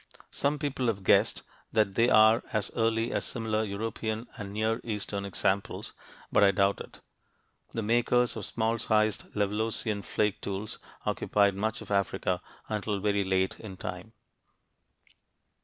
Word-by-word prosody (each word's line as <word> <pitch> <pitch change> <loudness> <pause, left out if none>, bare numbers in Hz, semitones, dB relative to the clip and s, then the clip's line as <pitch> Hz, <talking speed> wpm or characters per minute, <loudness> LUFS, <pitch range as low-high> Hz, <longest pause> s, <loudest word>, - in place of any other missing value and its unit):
Some 145 +1 0
people 140 -4 -1
have 100 -4 -1
guessed - - +3 0.3
that 105 -3 +2
they 115 +4 +4
are 110 0 +6
as 110 -2 -1
early 115 0 +1
as - - -1
similar 110 -2 -1
European 110 +2 -3
and 100 -4 -6
Near 110 +3 0
Eastern 105 -2 -3
examples, 100 0 -1 0.4
but 105 - +5
I 100 - +7
doubt 100 +1 +2
it. - - -12 0.7
The 115 - -2
makers 120 +2 +2
of 110 -4 -4
small 115 0 0
sized 110 -1 +1
Levalloisian 105 0 -1
flake 105 0 0
tools 100 +2 -4 0.3
occupied 100 -1 +2
much 110 +3 -2
of - - -11
Africa 100 -2 0 0.3
until 105 -1 -2
very 100 0 +1
late 95 0 0
in 95 -4 -8
time. - - -6
110 Hz, 140 wpm, -29 LUFS, 100-115 Hz, 0.7 s, I